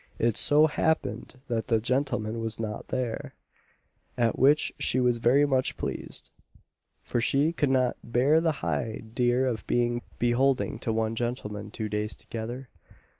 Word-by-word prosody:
It 115 -2 +1
so 150 +1 +5
happened 160 -1 -1
that 115 -2 -2
the 115 -2 +3
gentleman 120 -2 -1
was 115 -1 -3
not 105 -2 -4
there; 125 -3 -3 0.8
at 115 -2 +1
which 145 +4 +4
she 130 - +1
was 125 -2 +2
very 130 +5 +4
much 130 -2 0
pleased; - - -5 0.7
for 120 - -1
she 140 +7 +2
could 145 -4 +1
not 130 -2 +2
"bear 135 +7 +3
the 165 -1 +2
highdear 115 - 0
of 120 -4 -3
being 120 0 +1 0.2
beholding 125 +2 +1
to 115 - -2
one 110 0 0
gentleman 110 -4 -4
two 110 0 -4
days 105 +1 -2
together." 120 +3 -6
120 Hz, 145 wpm, -27 LUFS, 115-130 Hz, 0.8 s, so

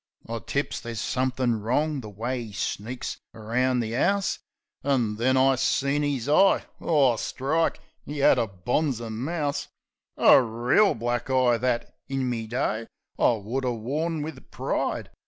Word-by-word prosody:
I 115 0 -3
tips 140 +5 -2
there's 115 -2 -6
somethin' 125 -2 0
wrong, 145 +6 0
the 110 - -8
way 120 +5 -3
'e 110 -3 -8
sneaks 110 +6 -4 0.2
around 125 +3 0
the 115 0 -3
'ouse. 200 +8 +1 0.4
An' 120 -7 +1
then 130 +3 +2
I 135 +1 +5
seen 140 +2 +1
'is 140 -4 -1
eye. 190 +7 +5 0.2
Oh, 140 -8 +3
strike! 155 +9 0 0.3
'E 150 0 -5
'ad - - +6
a 115 - +1
bonzer 115 - -1
mouse! 145 +5 -2 0.5
A - - +7
reel 120 - +2
black 120 +2 -2
eye, 130 -2 +3
that, 120 0 -1 0.2
in 135 -1 -1
me 115 -3 -2
day, 115 -2 -1 0.3
I - - +5
would 115 +5 -3
'a' 125 -1 0
worn 150 +8 -2
wiv 150 -5 -8
pride. - - -2
125 Hz, 155 wpm, -26 LUFS, 115-140 Hz, 0.5 s, A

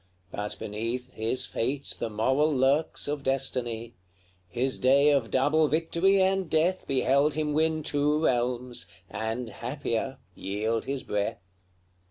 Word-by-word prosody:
But 105 +2 -4
beneath 115 +4 -4
His 115 +4 0
fate 135 +4 -2
the - - -2
moral 130 +8 +2
lurks 140 +4 +1
of 145 -1 -2
destiny; 125 -4 -2 0.6
His 130 +8 -1
day 140 +3 +5
of 135 -6 +1
double 150 +4 +3
victory 170 +5 +2
and 190 -2 +2
death 170 +4 +1
Beheld 140 +2 +2
him 155 -1 -1
win 155 0 +1
two 145 +1 +1
realms, 125 0 -1 0.2
and, 110 +2 -3
happier, 125 +2 -3 0.2
yield 105 +5 -2
his 135 -1 -3
breath. 105 0 -1
135 Hz, 130 wpm, -28 LUFS, 115-150 Hz, 0.6 s, day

